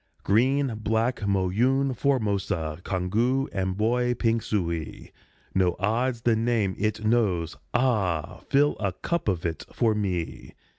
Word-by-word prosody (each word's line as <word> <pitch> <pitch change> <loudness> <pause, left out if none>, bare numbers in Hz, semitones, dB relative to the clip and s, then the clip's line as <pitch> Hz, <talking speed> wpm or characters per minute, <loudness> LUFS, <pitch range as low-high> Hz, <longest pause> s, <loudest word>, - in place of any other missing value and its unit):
Green, 130 +5 +2
Black, 110 +3 0
Moyune, 120 +8 +1
Formosa, 100 - -1
Congou, 115 +9 0
Amboy, 110 +6 0
Pingsuey 105 -9 -2 0.4
No 90 -2 +2
odds 115 +5 0
the 115 -1 +3
name 110 -4 +1
it 105 +1 -1
knows 100 -8 +1 0.2
ah! 105 -11 0
Fill 145 +2 +3
a 100 -3 -1
cup 170 - -3
of 90 -5 0
it 80 -3 -2
for 115 -2 +2
me! 95 -6 -3
110 Hz, 115 wpm, -26 LUFS, 95-120 Hz, 0.4 s, the